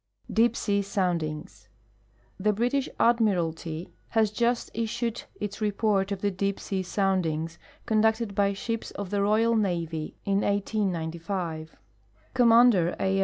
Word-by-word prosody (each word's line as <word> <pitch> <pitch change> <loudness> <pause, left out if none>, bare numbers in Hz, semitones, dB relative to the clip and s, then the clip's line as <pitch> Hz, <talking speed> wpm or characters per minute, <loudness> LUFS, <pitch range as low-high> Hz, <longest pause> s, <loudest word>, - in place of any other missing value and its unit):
Deep 230 +1 +4
se.\ 200 -1 0
Soundings. 175 -6 -2 0.7
The 210 +2 +2
British 245 +6 0
Admiralty 175 -8 +1
has 220 -2 +2
just 235 +2 0
issued 230 +1 -2 0.2
its 210 +1 -5
report 205 -1 +1
of 195 -1 -3
the 205 - +1
deep 195 +1 -2
sea 195 -2 -2
soundings 170 -4 -1 0.3
conducted 220 0 +2
by 200 0 +2
shij^s 230 +3 -4
of 200 -2 -6
the 205 -1 +1
royal 220 +3 +3
navy 170 -6 -1
in 200 0 +2
1895. 175 -5 -2 0.6
Commander 230 -7 +5
A. 195 0 +1
200 Hz, 120 wpm, -27 LUFS, 180-220 Hz, 0.7 s, Commander